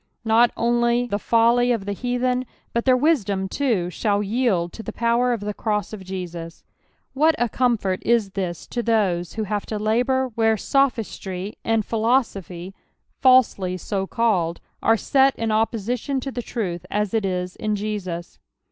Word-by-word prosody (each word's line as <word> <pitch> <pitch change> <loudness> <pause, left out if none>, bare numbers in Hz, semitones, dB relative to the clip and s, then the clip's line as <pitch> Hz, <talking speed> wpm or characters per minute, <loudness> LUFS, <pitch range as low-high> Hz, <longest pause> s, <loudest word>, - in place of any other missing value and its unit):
Not 230 +2 +5
only 240 +1 +2
the 205 -4 -2
folly 235 +3 +3
of 225 -5 -1
the 205 - -2
heathen, 250 +2 -1 0.3
but 235 - 0
their 255 -1 +5
wisdom 205 - +1
too, 200 -8 0
shall 205 +1 0
yield 205 -6 0
to - - -7
the - - -6
power 235 +1 +1
of 235 -4 -1
the 210 0 -3
cross 210 -1 -2
of 200 -3 -7
Jesus: 175 -3 -7 0.5
what 310 +3 +3
a 240 - +1
comfort 225 -7 0
is 225 -4 +2
this 185 -3 -4
to 240 - -2
those 200 -7 +1
who 220 - -2
have 210 0 -3
to 215 - -3
labour 245 +5 +1
where 225 0 +2
sophistry, 215 -8 -1
and 225 -2 +1
philo 235 +4 +3
sophy, 185 -3 -9 0.5
falsely 235 -8 +4
so 195 +1 -3
called, 185 -8 0 0.2
are 225 - +4
set 270 +3 +3
in 225 -1 -2
opposition 225 +4 0
to 270 - -4
tli^ruth 215 -8 -3
as 210 0 -1
it 220 -2 +1
is 180 -1 -2
in 215 -1 -1
Jesus. 195 -5 -5
220 Hz, 165 wpm, -23 LUFS, 195-240 Hz, 0.5 s, Not